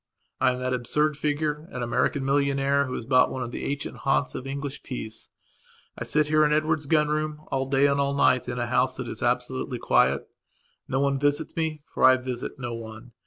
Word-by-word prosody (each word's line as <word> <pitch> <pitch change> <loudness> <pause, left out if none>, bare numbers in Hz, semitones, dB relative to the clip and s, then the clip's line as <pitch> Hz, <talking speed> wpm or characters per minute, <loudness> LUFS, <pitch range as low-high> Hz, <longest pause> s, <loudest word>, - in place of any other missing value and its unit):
I 125 - +3
am - - -5
that 130 0 -2
absurd 150 +5 +1
figure, 150 +1 -2
an 125 - -4
American 135 +3 0
millionaire, 140 0 +2
who 130 - -5
has 115 - -5
bought 130 0 +4
one 130 - -3
of 120 - -6
the - - -5
ancient 145 +1 -4
haunts 135 0 0
of 130 - -6
English 140 0 -5
peace. 110 -4 -7 0.7
I - - -5
sit 150 +1 +2
here, 155 0 +4
in 150 - +3
Edward's 155 -1 +1
gun 150 0 +3
room, 155 0 -2
all 135 -1 0
day 135 +1 +4
and 140 0 +3
all 140 0 0
day 125 -2 +3
in 120 - -5
a 120 - -1
house 125 +2 +1
that 130 -1 -5
is 110 - -6
absolutely 125 +1 -1
quiet. 70 - +2 0.6
No 135 +1 0
one 140 -1 +1
visits 145 +2 0
me, 160 -2 -2
for - - -4
I 130 0 +8
visit 125 +1 -5
no 120 -3 -4
one. 115 +1 -9
135 Hz, 215 wpm, -26 LUFS, 125-150 Hz, 0.7 s, I